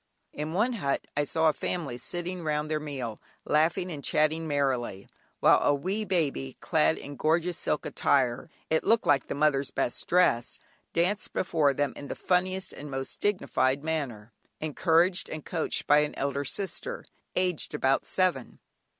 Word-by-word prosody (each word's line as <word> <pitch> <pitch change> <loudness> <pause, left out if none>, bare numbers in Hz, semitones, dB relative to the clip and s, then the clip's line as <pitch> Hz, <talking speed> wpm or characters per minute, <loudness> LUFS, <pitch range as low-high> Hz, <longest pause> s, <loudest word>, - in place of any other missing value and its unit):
In 150 +2 -4
one 225 +7 +2
hut 140 -11 -1
I 145 0 +1
saw 160 +3 +2
a 155 - +4
family 155 -8 -3
sitting 175 +8 -4
round 150 0 -1
their 155 - +1
meal, 135 -7 -5 0.2
laughing 170 +4 +2
and 145 -3 -6
chatting 155 0 +1
merrily, 130 -9 -1 0.3
while - - +6
a 145 - +3
wee 195 +9 -2
baby, 150 - -1
clad 80 +1 +2
in 145 0 -8
gorgeous 165 +4 +1
silk 150 - -1
attire 130 0 +1 0.2
(it 160 - +2
looked 225 0 +3
like 140 -3 +3
the - - -3
mother's 140 -2 +2
best 120 - -2
dress) 170 -10 +3 0.3
danced 185 +4 0
before 155 -6 +2
them 145 -1 0
in 145 - -8
the - - -4
funniest 185 +1 0
and 145 - -8
most 135 -1 -4
dignified 140 -9 +1
manner, 125 -9 -3 0.3
encouraged 165 +4 +2
and 155 -2 -6
coached 165 -3 -1
by 145 +1 +6
an 150 0 -1
elder 140 +1 -2
sister, 200 - -4 0.3
aged 180 -5 0
about 135 -2 +2
seven. 180 -10 0
150 Hz, 160 wpm, -28 LUFS, 140-175 Hz, 0.3 s, while